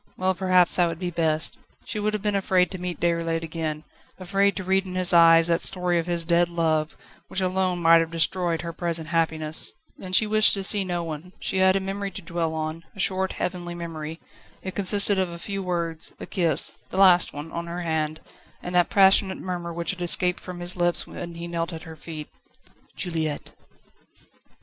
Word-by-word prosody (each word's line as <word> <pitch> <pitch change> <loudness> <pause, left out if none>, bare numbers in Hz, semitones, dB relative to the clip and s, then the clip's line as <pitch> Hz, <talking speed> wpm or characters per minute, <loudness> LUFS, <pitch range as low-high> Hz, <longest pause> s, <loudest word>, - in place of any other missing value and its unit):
Well, 185 0 +1
perhaps 185 -1 +3
that 175 -1 +3
would 165 -1 -5
be 180 0 -4
best. 160 -2 0 0.3
She 215 - -4
would 215 +1 -1
have 210 - -5
been 210 -1 0
afraid 185 -2 +1
to 190 - -6
meet 180 -2 -5
Déroulède 165 -1 -1
again, 160 -2 -4 0.3
afraid 195 +2 0
to 190 - -5
read 190 +1 0
in 185 - -7
his 185 0 +5
eyes 165 -1 +6
that 170 0 +2
story 180 -2 +3
of 165 - -4
his 170 -1 -2
dead 170 +1 +2
love, 160 -2 -1 0.3
which - - -4
alone 185 -1 -1
might 165 0 +6
have 165 0 -1
destroyed 170 0 -1
her 170 0 -6
present 165 -2 -2
happiness. 160 - +1 0.3
And 185 -1 -1
she 220 - +5
wished 215 0 +5
to 195 - -4
see 200 +1 +3
no 175 -2 -3
one. 165 +3 -8
She 190 - -2
had 190 0 +4
a - - +2
memory 195 +1 -4
to 195 - -7
dwell 165 -1 -3
on 155 +1 -4
a - - -13
short, 190 0 0
heavenly 175 -1 -4
memory. 165 -1 -7 0.4
It 190 - -5
consisted 200 0 +4
of 185 -2 0
a 170 - -8
few 195 +3 -5
words, 170 -3 -3
a - - -6
kiss 165 -5 +2 0.2
the - - -6
last 185 -2 +5
one 150 +3 -8
on 170 0 -5
her 175 +1 -5
hand, 155 -2 -2 0.4
and 180 - -6
that 175 -1 +3
passionate 195 -1 +4
murmur 175 -2 -5
which 170 +1 -2
had 185 -2 -9
escaped 180 +1 +4
from 180 -1 -9
his 175 +1 -3
lips 175 -1 +2
when 170 -1 -8
he 170 0 -7
knelt 170 0 -3
at 160 - -8
her 160 -2 -10
feet: 155 -1 -9 0.7
"Juliette!" 160 -4 -4
175 Hz, 205 wpm, -24 LUFS, 165-185 Hz, 0.7 s, eyes